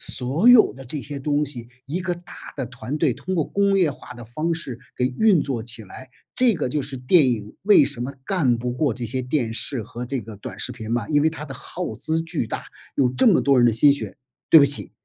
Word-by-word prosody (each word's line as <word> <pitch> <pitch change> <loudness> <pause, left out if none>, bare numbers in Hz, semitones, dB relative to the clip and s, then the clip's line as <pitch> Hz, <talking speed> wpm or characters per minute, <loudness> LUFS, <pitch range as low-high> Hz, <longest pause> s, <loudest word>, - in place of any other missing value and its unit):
所 140 - +2
有 245 -3 +7
的 135 0 -12
这 145 +4 -5
些 140 0 -7
东 145 +1 0
西， 120 -4 -7 0.2
一 165 +6 -3
个 180 -1 -2
大 175 0 -14 0.2
的 130 -3 -3
团 130 +4 -6
队 150 -6 +2
通 185 +10 -5
过 155 - +1
工 200 0 +1
业 160 -6 +2
化 - - -12
的 120 -1 -10
方 155 +9 -3
式 130 -7 -5 0.2
给 125 - +1
运 205 -8 +5
作 125 -6 -3
起 115 -2 -2
来， 130 +6 -12 0.2
这 250 -3 +4
个 150 -6 -2
就 145 +2 -2
是 135 0 -6
电 130 +2 +4
影 105 -2 -4
为 210 +1 +6
什 140 -4 -3
么 130 +3 -4
干 135 -11 +1
不 125 +1 -3
过 135 0 0
这 120 0 -5
些 130 +3 -2
电 125 -3 -1
视 120 -2 -1
和 120 +1 -7
这 130 0 -3
个 110 -1 -10
短 100 0 -9
视 100 - -3
频 110 -1 -8
嘛， 120 0 -1
因 145 -1 +2
为 160 - +3
它 150 -2 -8
的 135 -3 -8
耗 180 +6 -5
资 160 +1 -1
巨 160 -8 -3
大， - - -5 0.3
有 130 -2 +3
这 130 - +3
么 190 - +4
多 140 -1 +3
人 120 - +5
的 - - +2
心 140 +6 +5
血， 140 - -6 0.3
对 160 - +9
不 140 - +6
起 140 - +4
135 Hz, 270 characters per minute, -22 LUFS, 120-160 Hz, 0.3 s, 对